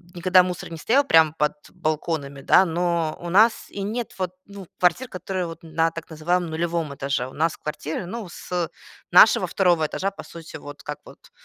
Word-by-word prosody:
никогда 180 Hz, +1 st, +5 dB
мусор 180 Hz, -2 st, -5 dB
не 165 Hz, -, -6 dB
стоял 250 Hz, -, +3 dB
прямо 160 Hz, -, +5 dB
под 150 Hz, 0 st, +1 dB, 0.2 s
балконами, 155 Hz, -4 st, -3 dB
да, 185 Hz, +7 st, +5 dB
но 170 Hz, -2 st, -1 dB
у 175 Hz, -, -5 dB
нас 215 Hz, +6 st, +4 dB
и 200 Hz, -, -6 dB
нет 225 Hz, +3 st, -4 dB
вот, 185 Hz, -2 st, -1 dB
ну, 200 Hz, -2 st, -11 dB
квартир, 180 Hz, +9 st, +2 dB
которые 185 Hz, 0 st, -3 dB
вот 165 Hz, 0 st, -9 dB
на 165 Hz, 0 st, 0 dB
так 165 Hz, 0 st, -9 dB
называемом 170 Hz, +2 st, -1 dB
нулевом 165 Hz, -2 st, -2 dB
этаже. 135 Hz, -2 st, -2 dB
У 130 Hz, -, -12 dB
нас 160 Hz, +2 st, 0 dB
квартиры, 155 Hz, +2 st, -5 dB
ну, 215 Hz, +3 st, -6 dB
с 175 Hz, 0 st, -3 dB, 0.4 s
нашего -, -, +7 dB
2 175 Hz, -4 st, +2 dB
этажа, 190 Hz, +5 st, -2 dB
по 195 Hz, -, -10 dB
сути, 165 Hz, -1 st, -10 dB
вот 145 Hz, -1 st, -10 dB
как 150 Hz, -1 st, -5 dB
вот -, -, -16 dB
170 Hz, 190 wpm, -23 LUFS, 155-185 Hz, 0.4 s, нашего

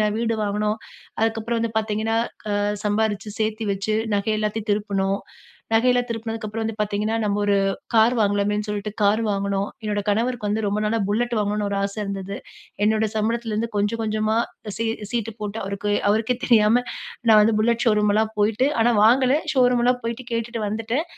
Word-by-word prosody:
ஏன்னா, 210 Hz, -, +3 dB
வீடு 230 Hz, -1 st, 0 dB
வாங்குனோம். 210 Hz, +1 st, -1 dB, 0.4 s
அதுக்கப்புறம் 225 Hz, +1 st, 0 dB
வந்து 225 Hz, -1 st, -2 dB
பாத்தீங்கன்னா, 220 Hz, +1 st, -1 dB, 0.4 s
அ, -, -, 0 dB, 0.3 s
சம்பாரிச்சு 210 Hz, 0 st, 0 dB
சேர்த்து 220 Hz, +1 st, -1 dB
வச்சு, 200 Hz, +2 st, -1 dB, 0.2 s
நகை 205 Hz, +2 st, 0 dB
எல்லாத்தையும் 215 Hz, +1 st, -2 dB
திருப்பினோம். 200 Hz, -1 st, 0 dB, 0.5 s
நகையெல்லாம் 245 Hz, +2 st, +3 dB
திருப்பினதுக்கு 225 Hz, -1 st, -4 dB
அப்புறம் 225 Hz, +2 st, -4 dB
வந்து 225 Hz, 0 st, -3 dB
பாத்தீங்கன்னா, 210 Hz, +2 st, -1 dB
நம்ம 205 Hz, -1 st, 0 dB
ஒரு 205 Hz, -1 st, +3 dB, 0.4 s
கார் 225 Hz, +2 st, +5 dB
வாங்கலாமேன்னு 205 Hz, 0 st, +1 dB
சொல்லிட்டு, 210 Hz, 0 st, -3 dB
கார் 205 Hz, +3 st, +3 dB
வாங்குனோம். 200 Hz, 0 st, -1 dB
என்னோட 205 Hz, -1 st, -1 dB
கணவருக்கு 225 Hz, +1 st, 0 dB
வந்து 215 Hz, +1 st, -1 dB
ரொம்ப 205 Hz, +1 st, 0 dB
நாளா, 220 Hz, +2 st, +1 dB
புல்லெட் 240 Hz, +4 st, 0 dB
வாங்கணும்னு 210 Hz, 0 st, 0 dB
ஒரு 200 Hz, -, -1 dB
ஆசை 200 Hz, +2 st, -3 dB
இருந்தது. 195 Hz, 0 st, -4 dB, 0.5 s
என்னோட 220 Hz, +1 st, +3 dB
சம்பளத்திலேந்து 225 Hz, 0 st, -1 dB
கொஞ்ஜோ, 205 Hz, +2 st, +1 dB
கொஞ்ஜமா 215 Hz, 0 st, 0 dB, 0.4 s
சீ 230 Hz, -, -1 dB, 0.3 s
சீட்டு 225 Hz, -2 st, -2 dB
போட்டு 210 Hz, +1 st, -4 dB
அவருக்கு 200 Hz, +1 st, -3 dB, 0.2 s
அவருக்கே 220 Hz, +4 st, +1 dB
தெரியாம, 230 Hz, +1 st, +4 dB, 0.5 s
நான் 215 Hz, -1 st, +8 dB
வந்து 215 Hz, +1 st, +3 dB
புல்லட் 235 Hz, +3 st, +2 dB
ஷோரூம்லாம் 210 Hz, 0 st, +3 dB
போய்ட்டு 220 Hz, +6 st, +2 dB
ஆனா 240 Hz, +1 st, +4 dB
வாங்கல. 255 Hz, +4 st, +5 dB, 0.2 s
ஷோரூம்லாம் 250 Hz, -1 st, +3 dB
போய்ட்டு, 235 Hz, +2 st, -4 dB
கேட்டுட்டு 230 Hz, 0 st, -2 dB
வந்துட்டேன். 225 Hz, +8 st, -1 dB
215 Hz, 160 wpm, -23 LUFS, 205-230 Hz, 0.5 s, நான்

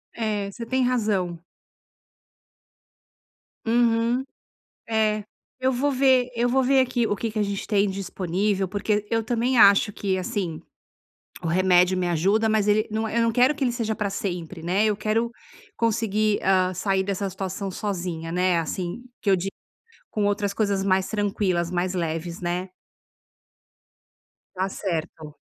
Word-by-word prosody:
É, 210 Hz, -3 st, -2 dB
você 230 Hz, -, -7 dB
tem 260 Hz, +2 st, +1 dB
razão. 205 Hz, -9 st, 0 dB, 2.2 s
Uhum, 235 Hz, +2 st, +2 dB, 0.6 s
é, 215 Hz, -2 st, +1 dB, 0.3 s
eu 260 Hz, +1 st, +1 dB
vou 270 Hz, +4 st, +1 dB
ver 260 Hz, -2 st, +3 dB
eu 240 Hz, +1 st, +2 dB
vou 265 Hz, +2 st, +3 dB
ver 270 Hz, +1 st, +3 dB
aqui 245 Hz, -3 st, +1 dB
o 205 Hz, -, 0 dB
que 230 Hz, -, -2 dB
que 215 Hz, 0 st, -2 dB
a -, -, +3 dB
gente 200 Hz, -1 st, -3 dB
tem 205 Hz, -2 st, +2 dB
disponível, 190 Hz, +1 st, -1 dB
porque 205 Hz, +2 st, -1 dB
eu 225 Hz, -1 st, +1 dB
também 240 Hz, +2 st, +1 dB
acho 200 Hz, +1 st, +6 dB
que 195 Hz, -1 st, -1 dB
assim 180 Hz, -3 st, -3 dB, 0.8 s
o 170 Hz, -, -3 dB
remédio 180 Hz, +1 st, +4 dB
me 180 Hz, -1 st, 0 dB
ajuda, 195 Hz, +7 st, +2 dB
mas 215 Hz, -1 st, +2 dB
ele 210 Hz, +1 st, +3 dB
não 220 Hz, +1 st, -1 dB
Eu 230 Hz, +1 st, +1 dB
não 230 Hz, -, +2 dB
quero 250 Hz, +6 st, +4 dB
que 280 Hz, -, -2 dB
ele 250 Hz, -, +2 dB
seja 230 Hz, -2 st, -2 dB
pra 205 Hz, -1 st, -1 dB
sempre, 180 Hz, -4 st, -4 dB
né. 185 Hz, +5 st, +1 dB
Eu 210 Hz, -1 st, +2 dB
quero 225 Hz, +3 st, 0 dB, 0.4 s
conseguir, 215 Hz, -2 st, +1 dB
ah, 185 Hz, -1 st, +3 dB
sair 195 Hz, +1 st, +1 dB
dessa 200 Hz, 0 st, -2 dB
situação 190 Hz, +1 st, -4 dB
sozinha, 175 Hz, -5 st, -4 dB
né. 180 Hz, 0 st, +2 dB
Assim 175 Hz, +7 st, -4 dB, 0.2 s
que 200 Hz, -, +1 dB
eu -, -, +6 dB
di 190 Hz, +2 st, -3 dB, 0.6 s
com 210 Hz, -2 st, -1 dB
outras 205 Hz, 0 st, 0 dB
coisas 200 Hz, -2 st, 0 dB
mais 190 Hz, -1 st, +2 dB
tranquilas, 195 Hz, -5 st, 0 dB
mais 180 Hz, +1 st, -1 dB
leves, 170 Hz, 0 st, -3 dB
né? 180 Hz, +1 st, -2 dB, 1.9 s
Tá 190 Hz, +1 st, -1 dB
certo. 160 Hz, -5 st, -4 dB
200 Hz, 155 wpm, -24 LUFS, 185-225 Hz, 2.2 s, acho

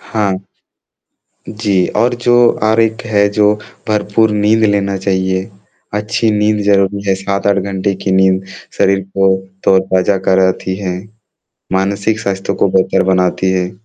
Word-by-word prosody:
हाँ, 105 Hz, -3 st, -2 dB, 1.2 s
जी, 100 Hz, -4 st, 0 dB
और 120 Hz, +1 st, +2 dB
जो 120 Hz, 0 st, +1 dB, 0.3 s
आरक्त 110 Hz, +1 st, +1 dB
है, 100 Hz, -2 st, +2 dB
जो 105 Hz, 0 st, +2 dB, 0.3 s
भरपूर 105 Hz, +1 st, +1 dB
नींद 105 Hz, +2 st, +2 dB
लेना 100 Hz, -1 st, +1 dB
चाहिए। 95 Hz, 0 st, -1 dB, 0.4 s
अच्छी 110 Hz, +2 st, 0 dB
नींद 105 Hz, 0 st, +1 dB
ज़रूरी 100 Hz, 0 st, +1 dB
है 95 Hz, -, +3 dB
7-8 100 Hz, +1 st, -1 dB
घंटे 100 Hz, 0 st, -2 dB
की 95 Hz, -, -1 dB
नींद 95 Hz, 0 st, +2 dB, 0.3 s
शरीर 95 Hz, 0 st, +3 dB
को 95 Hz, 0 st, +1 dB, 0.3 s
तरोताज़ा 95 Hz, 0 st, +2 dB
कराती 95 Hz, 0 st, +1 dB
है, 90 Hz, -2 st, -4 dB, 0.7 s
मानसिक 100 Hz, +3 st, 0 dB
स्वास्थ्य 95 Hz, -3 st, -2 dB
को -, -, +1 dB
बेहतर 95 Hz, -, +1 dB
बनाती 90 Hz, 0 st, +1 dB
है। 90 Hz, -1 st, -1 dB
100 Hz, 130 wpm, -14 LUFS, 95-105 Hz, 1.2 s, है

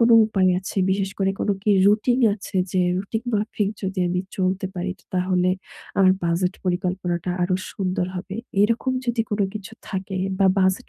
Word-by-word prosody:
কোনো 230 Hz, 0 st, +6 dB
উপায় 190 Hz, -4 st, +2 dB
আছে 190 Hz, +2 st, -7 dB
বিশেষ 195 Hz, 0 st, 0 dB
করে 195 Hz, 0 st, +2 dB
কোনো 205 Hz, -, +2 dB
কি 210 Hz, -, +2 dB, 0.2 s
রুটিন 230 Hz, +5 st, +3 dB
আছে 195 Hz, -2 st, -7 dB, 0.2 s
যে, 185 Hz, -, +2 dB, 0.2 s
রুটিন 220 Hz, +4 st, -3 dB
মাফিক 210 Hz, -1 st, 0 dB
যদি 190 Hz, 0 st, -3 dB
আমি 180 Hz, +1 st, 0 dB, 0.2 s
চলতে 190 Hz, 0 st, 0 dB
পারি 180 Hz, +1 st, -2 dB, 0.2 s
তাহলে 180 Hz, 0 st, +2 dB, 0.5 s
আমার 185 Hz, -1 st, +6 dB
বাজেট 180 Hz, +2 st, +1 dB
পরিকল্পনাটা 180 Hz, -1 st, -1 dB
আরো 180 Hz, +1 st, +1 dB, 0.2 s
সুন্দর 185 Hz, -2 st, -1 dB
হবে? 190 Hz, +2 st, -6 dB, 0.3 s
এরকম 230 Hz, +4 st, +1 dB
যদি 235 Hz, -1 st, +1 dB
কোনো 205 Hz, -1 st, +1 dB
কিছু 210 Hz, +1 st, -7 dB, 0.2 s
থাকে 190 Hz, -1 st, -4 dB, 0.2 s
বা 195 Hz, -, +5 dB
বাজেট 190 Hz, +5 st, +1 dB
190 Hz, 165 wpm, -23 LUFS, 185-205 Hz, 0.5 s, কোনো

